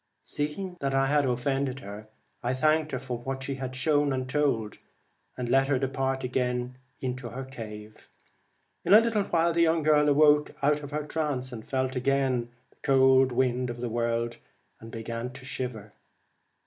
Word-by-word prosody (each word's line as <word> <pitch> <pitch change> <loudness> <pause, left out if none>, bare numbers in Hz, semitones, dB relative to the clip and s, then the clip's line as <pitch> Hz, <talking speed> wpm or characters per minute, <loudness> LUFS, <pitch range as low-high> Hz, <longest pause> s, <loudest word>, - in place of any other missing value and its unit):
Seeing 180 +5 -3
that 135 -1 -1
I 135 0 +3
had 145 0 +2
offended 135 +2 -1
her, 105 0 -9 0.3
I 125 +2 -1
thanked 155 +3 +2
her 130 - -1
for 125 -2 -5
what 135 +2 -4
she 135 - -3
had 130 -1 -5
shown 145 +1 +2
and 130 -1 -2
told, 130 -7 0 0.6
and 125 - -3
let 135 +2 +3
her 140 -2 +2
depart 135 0 -1
again 125 0 -2 0.2
into 130 -1 -4
her 130 +4 -6
cave. 110 -4 -10 0.7
In 200 - +6
a - - +11
little 225 -2 +1
while 170 0 +2
the 170 - +2
young 165 -1 +3
girl 150 -1 +4
awoke 150 0 +4
out 150 +1 +3
of 145 - -7
her 150 +1 -3
trance, 145 -4 -2
and 115 -3 -8
felt 130 0 -1
again 130 -2 +1 0.2
the - - -29
cold 130 -1 +5
wind 125 0 +1
of 120 0 -6
the 120 0 -3
world, 115 0 -1 0.4
and 115 - -11
began 115 +2 -5
to 130 0 -11
shiver. 120 -5 -5
130 Hz, 175 wpm, -28 LUFS, 125-145 Hz, 0.7 s, a